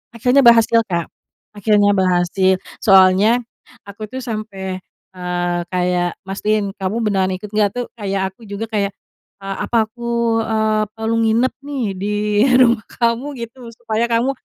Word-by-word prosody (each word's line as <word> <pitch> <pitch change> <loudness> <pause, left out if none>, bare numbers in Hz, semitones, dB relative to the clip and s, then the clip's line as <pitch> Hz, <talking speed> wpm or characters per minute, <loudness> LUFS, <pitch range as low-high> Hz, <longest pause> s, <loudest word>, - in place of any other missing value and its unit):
Akhirnya 250 +4 +3
berhasil 235 -2 +6
Kak, 170 -3 -2 0.4
akhirnya 205 0 +2
berhasil, 185 0 +2 0.2
soalnya, 195 +4 +5 0.4
aku 205 +2 -9
tuh 260 +4 -7
sampai, 200 -5 -5 0.3
eee, 175 -1 -2
kayak 180 -1 -1
mastiin 200 +1 -1
kamu 190 +3 -2
beneran 190 -3 +1
ikut 200 +2 -9
nggak, 210 -1 +2
tuh? 245 0 -2
Kayak 195 -2 -2
aku 210 - -28
juga 200 +3 -4
kayak, 200 -2 0 0.5
ah 195 0 -4
apa 230 -2 +2
aku, 235 0 -1
eee, 220 -1 +1
perlu 225 +1 -1
nginep 230 +3 +2
nih, 280 -3 -3 0.2
di 200 - -3 0.5
rumah 240 -3 +4
kamu 235 +2 0 0.2
gitu, 235 +3 -11 0.2
supaya 230 0 -1
kamu, 235 +3 +1
215 Hz, 140 wpm, -18 LUFS, 190-230 Hz, 0.5 s, berhasil